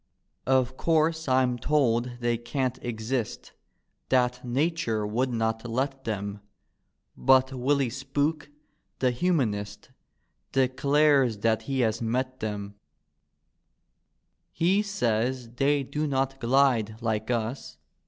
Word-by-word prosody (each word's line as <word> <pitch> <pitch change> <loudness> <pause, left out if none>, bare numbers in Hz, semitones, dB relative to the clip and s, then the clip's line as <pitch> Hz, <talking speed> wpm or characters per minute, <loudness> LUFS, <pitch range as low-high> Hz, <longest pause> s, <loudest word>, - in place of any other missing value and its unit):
Of 130 -1 +2
course 160 -1 +1
I'm 130 -2 +2
told 125 -4 +1
they 120 0 +1
can't 125 +2 -2
exist. 115 0 -3 0.6
That 125 -1 +2
Nature 130 -4 0
would 120 +5 0
not 115 0 -2
let 135 +3 -2
them: 100 -2 -3 0.8
But 130 0 +4
Willy 130 0 +1
Spook, 145 +4 -2 0.5
the 130 -1 +2
Humanist, 120 - -1 0.6
Declares 135 -1 +3
diat 110 +1 +1
he 135 -2 -1
has 110 -1 0
met 130 +3 -2
tbeml 105 -2 -4 1.8
He 180 +5 +2
says 125 - -1
they 140 +1 +2
do 150 +3 -2
not 135 -1 -1
glide 120 -4 +2
like 110 -1 -2
us. 120 +2 -3
130 Hz, 105 wpm, -27 LUFS, 115-140 Hz, 1.8 s, But